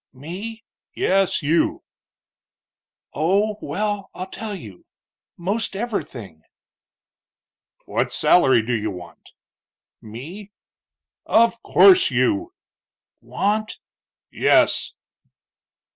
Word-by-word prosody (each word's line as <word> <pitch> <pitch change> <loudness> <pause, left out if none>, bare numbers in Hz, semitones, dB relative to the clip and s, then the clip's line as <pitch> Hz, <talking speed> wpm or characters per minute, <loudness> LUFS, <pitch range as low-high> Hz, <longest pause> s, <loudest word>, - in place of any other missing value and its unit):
"Me?" 190 - -8 0.3
"Yes, 195 -4 +1
you." 160 +3 +1 1.3
"Oh, 200 +8 +1
well, 205 -1 -3
I'll 185 - -5
tell 215 0 -5
you. 105 - -12 0.5
Most 200 +4 -2
everything." 130 - -5 1.4
"What - - -1
salary 130 -9 +4
do 120 +2 -2
you 110 -2 -1
want?" 90 -3 -11 0.7
"Me?" 165 - -10 0.7
"Of 230 0 +3
course 375 -1 +6
you." 335 +2 0 0.7
"Want?" 215 +2 -2 0.5
"Yes." - - +2
195 Hz, 80 wpm, -22 LUFS, 130-215 Hz, 1.4 s, course